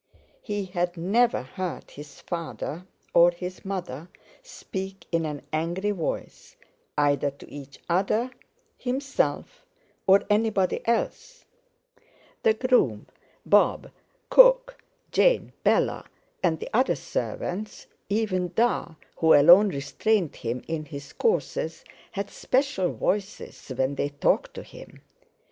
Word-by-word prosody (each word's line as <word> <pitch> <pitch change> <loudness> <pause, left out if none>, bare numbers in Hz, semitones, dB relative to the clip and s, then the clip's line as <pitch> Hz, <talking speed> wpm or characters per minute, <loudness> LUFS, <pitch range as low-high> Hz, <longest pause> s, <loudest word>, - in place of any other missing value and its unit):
He 205 -3 -3
had 175 -1 -2
never 210 - +2
heard 180 +6 -6
his 145 0 -12
father 170 0 -5 0.3
or 170 +1 +7
his 180 +1 -7
mother 180 -5 -5 0.3
speak 190 - -7
in 165 -2 +1
an 150 -2 -6
angry 175 +6 -1
voice, 180 -6 -5 0.4
either 145 -1 +2
to 140 - -14
each 140 -1 -10
other, 200 +8 +1 0.5
himself, 265 +2 -2 0.4
or 195 +1 +6
anybody 210 -2 +1
else; 470 - -2 1.0
the 220 - +3
groom, 220 - +2 0.4
Bob, - - +3 0.4
Cook, - - +6 0.3
Jane, - - +3
Bella - - +2 0.3
and - - +1
the 475 +3 -7
other - - +3
servants, 205 +4 -4 0.2
even 200 -4 0
"Da," 235 -8 +1 0.2
who 160 -1 +5
alone 175 +8 +8
restrained 165 +5 0
him 120 +1 -4
in 160 -2 -3
his 140 -1 -9
courses, 460 -1 -1 0.3
had 200 -1 -4
special 255 -9 0
voices 205 -5 -3
when 130 +2 0
they 140 +1 -1
talked 145 0 0
to - - -7
him. - - -14
185 Hz, 115 wpm, -26 LUFS, 155-220 Hz, 1.0 s, alone